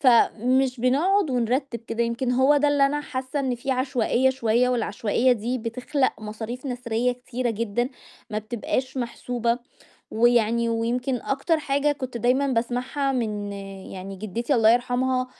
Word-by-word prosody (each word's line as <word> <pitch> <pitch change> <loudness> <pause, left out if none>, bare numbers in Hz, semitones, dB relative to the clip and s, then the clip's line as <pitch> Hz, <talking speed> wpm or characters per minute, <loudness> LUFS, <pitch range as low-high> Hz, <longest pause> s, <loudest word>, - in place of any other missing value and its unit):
فمش 255 0 +3
بنقعُد 310 +7 +2
ونرتّب 245 +1 0
كده 230 0 -2
يمكن 240 +2 -1
هو 265 +4 +4
ده 290 +1 +3
اللي 285 -1 +4
أنا 295 +1 -1
حاسّة 265 0 -4
إن 260 -2 0
في 265 +3 -4
عشوائية 260 0 +2
شوية، 245 -1 +2
والعشوائية 235 +1 +1
دي 245 +3 -2
بتخلَق 250 +2 -1
مصاريف 220 +5 -6
نسريّة 245 -1 -1
كتيرة 250 0 -3
جدًا 230 +2 -1 0.4
ما 215 - -1
بتبقاش 240 +4 -3
محسوبة، 240 -1 -1 0.5
ويعني 235 0 +3
ويمكن 245 +3 0
أكتر 295 +4 0
حاجة 285 0 +1
كنت 260 -4 -6
دايمًا 250 +4 +2
باسمعها 255 +3 -1
من 210 -5 -2 0.4
يعني 195 +1 -7
جدتي 230 +7 -2
الله 225 -2 +5
يرحمها، 255 +1 +1
245 Hz, 140 wpm, -24 LUFS, 230-265 Hz, 0.5 s, الله